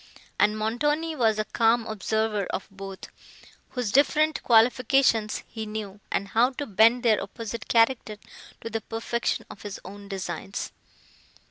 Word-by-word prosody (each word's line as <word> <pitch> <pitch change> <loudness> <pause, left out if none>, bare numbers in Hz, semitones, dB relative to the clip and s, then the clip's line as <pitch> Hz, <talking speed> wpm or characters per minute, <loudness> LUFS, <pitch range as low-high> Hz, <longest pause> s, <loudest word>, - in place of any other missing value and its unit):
And 210 +1 +3
Montoni 295 +9 0
was 225 -5 +2
a 215 - 0
calm 230 +1 +2
observer 220 -1 -1
of - - -4
both, 195 -1 -8 0.6
whose 245 -5 -3
different 305 +4 +3
qualifications 235 -1 +3
he 220 -2 -6
knew, 210 -2 -6
and 200 - -1
how 240 +5 +3
to 285 - -4
bend 225 +2 +4
their 220 -3 +3
opposite 230 0 -6
character 230 -2 +2 0.4
to 230 - -6
the 225 0 -2
perfection 230 +2 -2
of 205 - -12
his 205 -1 -6
own 200 +2 -10
designs. 190 0 -5
225 Hz, 140 wpm, -26 LUFS, 210-240 Hz, 0.6 s, bend